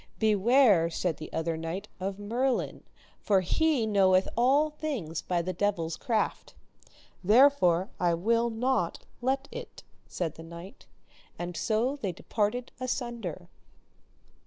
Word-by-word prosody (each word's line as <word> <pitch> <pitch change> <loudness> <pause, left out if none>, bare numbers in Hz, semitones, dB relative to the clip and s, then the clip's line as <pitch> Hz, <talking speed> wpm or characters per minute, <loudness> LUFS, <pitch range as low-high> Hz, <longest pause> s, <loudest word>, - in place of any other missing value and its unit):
Beware, 215 -4 +4
said 170 0 -2
the 155 - -9
other 165 0 -1
knight, 165 +5 -5
of 190 +1 -3
Merlin, 240 +5 -1 0.4
for 195 -3 +2
he 285 - +1
knoweth 190 -3 +3
all 275 +6 +3
things 270 - -4
by 175 -2 -1
the 185 +2 -3
devil's 170 -4 -1
craft. 225 -3 -2 0.7
Therefore 205 -5 +4
will 200 +7 +2
I - - -1
not 230 -5 -1 0.2
let 265 +3 0
it, - - -9 0.2
said 165 -4 -3
the 165 - -9
knight. 170 +4 -11 0.5
And 175 0 -5
so 235 - 0
they 200 -10 -3
departed 220 +7 -2
asunder. 240 - -4
205 Hz, 125 wpm, -29 LUFS, 175-250 Hz, 0.7 s, Beware